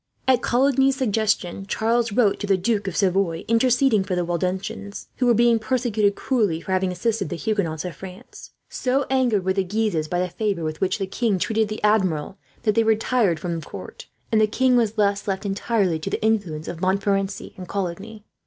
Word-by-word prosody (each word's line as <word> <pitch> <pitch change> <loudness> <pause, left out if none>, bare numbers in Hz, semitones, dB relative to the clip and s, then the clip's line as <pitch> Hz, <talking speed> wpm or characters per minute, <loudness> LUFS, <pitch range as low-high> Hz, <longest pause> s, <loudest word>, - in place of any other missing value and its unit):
At 255 -2 +4
Coligny's 270 +2 +3
suggestion, 210 -6 -1
Charles 230 +2 0
wrote 205 -2 +2
to 205 - -4
the 195 -1 +3
Duke 205 +1 -1
of 185 - -3
Savoy 185 -4 +1
interceding 240 -1 +3
for 190 -1 -2
the 175 -1 0
Waldenses, 190 +4 -4
who 250 - +1
were 240 - +5
being 235 0 +4
persecuted 220 -3 0
cruelly 210 -11 0
for 190 - -7
having 185 0 +1
assisted 210 +2 -1
the 175 - -3
Huguenots 175 -5 -2
of 180 - -5
France. 190 0 -11 0.2
So 265 +2 -1
angered 245 -8 +2
were 190 - +2
the 195 0 +1
Guises, 190 -5 -1
by 175 +2 -1
the 180 - 0
favour 195 -1 -2
with 155 0 -4
which 190 - +1
the 195 - -2
king 200 +1 0
treated 220 +3 0
the 215 0 -6
Admiral, 190 -6 +1 0.2
that 215 -3 +2
they 230 - +3
retired 220 -5 +2
from 170 -1 -3
court; - - -10 0.2
and 220 -1 +4
the 215 - +4
king 255 +3 +2
was 225 -3 +2
thus 205 -2 0
left 195 +1 -2
entirely 195 -3 0
to 155 - -4
the - - -3
influence 190 -9 0
of 170 -1 -6
Montmorency 195 +1 -1
and 185 -1 -9
Coligny. 200 +3 -5
205 Hz, 195 wpm, -23 LUFS, 185-225 Hz, 0.2 s, were